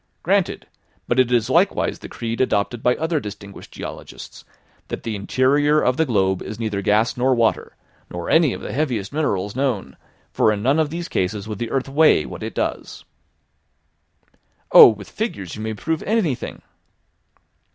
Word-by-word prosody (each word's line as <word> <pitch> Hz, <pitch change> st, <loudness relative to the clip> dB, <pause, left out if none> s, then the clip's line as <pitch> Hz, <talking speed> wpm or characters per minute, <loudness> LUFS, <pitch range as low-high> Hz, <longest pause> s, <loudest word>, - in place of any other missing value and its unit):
"Granted. 195 Hz, +1 st, 0 dB, 0.4 s
But 120 Hz, -, +1 dB
it 125 Hz, -1 st, +3 dB
is 120 Hz, -2 st, +2 dB
likewise 175 Hz, +9 st, +1 dB
the -, -, -10 dB
creed 115 Hz, 0 st, -4 dB
adopted 120 Hz, -1 st, 0 dB
by 125 Hz, 0 st, +2 dB
other 160 Hz, 0 st, -1 dB
distinguished 100 Hz, -3 st, -10 dB
geologists, -, -, -9 dB, 0.4 s
that -, -, -6 dB
the 115 Hz, -2 st, -3 dB
interior 140 Hz, +8 st, +2 dB
of 125 Hz, -3 st, +1 dB
the 160 Hz, -, +1 dB
globe 95 Hz, -5 st, +1 dB
is 110 Hz, -, -7 dB
neither 105 Hz, -3 st, -2 dB
gas 110 Hz, +4 st, +2 dB
nor 130 Hz, +1 st, +2 dB
water, 115 Hz, -2 st, 0 dB, 0.3 s
nor 90 Hz, -1 st, -6 dB
any 160 Hz, -4 st, +4 dB
of -, -, -6 dB
the -, -, -6 dB
heaviest 125 Hz, -8 st, -2 dB
minerals 105 Hz, -10 st, -1 dB
known, 120 Hz, -, -2 dB, 0.4 s
for 110 Hz, -, +3 dB
in 105 Hz, -1 st, -3 dB
none 135 Hz, +5 st, +3 dB
of 155 Hz, -2 st, +1 dB
these 170 Hz, +2 st, -5 dB
cases 100 Hz, -, -2 dB
would 105 Hz, -3 st, -6 dB
the 120 Hz, -, -3 dB
earth 135 Hz, -1 st, -1 dB
weigh 140 Hz, -, +4 dB
what -, -, -8 dB
it -, -, -6 dB
does." -, -, -4 dB, 1.7 s
"Oh, -, -, +11 dB
with 105 Hz, -3 st, -2 dB
figures 100 Hz, -, -5 dB
you 110 Hz, -, -7 dB
may 110 Hz, 0 st, -3 dB
prove 160 Hz, +8 st, -2 dB
anything!" 200 Hz, -, -2 dB
120 Hz, 170 wpm, -21 LUFS, 105-150 Hz, 1.7 s, Oh